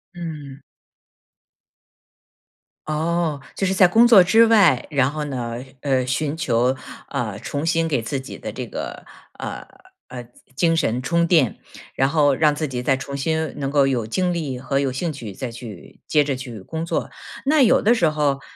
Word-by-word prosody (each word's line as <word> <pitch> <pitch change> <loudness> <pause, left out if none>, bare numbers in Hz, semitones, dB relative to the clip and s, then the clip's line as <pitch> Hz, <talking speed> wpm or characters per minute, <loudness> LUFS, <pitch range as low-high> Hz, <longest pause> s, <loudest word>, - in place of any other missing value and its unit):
嗯。 150 -5 -7 2.3
哦， 160 0 -1 0.2
就 195 - -1
是 190 - +1
在 185 -1 +6
工 225 +6 +5
作 215 -6 +8
之 225 +6 +5
外， 200 - +4
然 135 -3 +2
后 150 +1 -4
呢， 125 -4 -4 0.2
呃， 130 -3 +1
寻 145 +3 -1
求， 125 -5 +1 0.3
呃， 115 -7 -3
重 145 +7 -4
新 165 0 +1
给 140 -6 0
自 115 +5 -3
己 130 - -9
的 - - -6
这 - - -6
个， - - -7 0.3
呃， - - -6 0.4
呃， 125 -1 -7
精 120 - -22 0.4
精 - - +1
神 120 -5 0
充 170 +6 +1
电， 160 -8 +2 0.4
然 135 0 +2
后 145 -2 +3
让 150 +1 +3
自 150 +1 -3
己 125 -2 -4
再 135 +1 +2
重 140 +1 -6
新 160 +3 -1
能 135 -1 -3
够 140 -1 +3
有 120 -5 0
精 180 +10 0
力 145 -7 -3
和 135 +2 -1
有 135 - 0
兴 155 +5 -3
趣， 115 -8 -8
再 125 +5 -5
去 115 -6 -11
接 150 -2 +3
着 140 -2 -1
去 125 -4 -8
工 160 - -5
作。 - - -2 0.4
那 300 +1 +4
有 240 - +5
的 230 +3 +4
时 170 -9 +3
候， 145 -3 0
145 Hz, 195 characters per minute, -22 LUFS, 130-165 Hz, 2.3 s, 作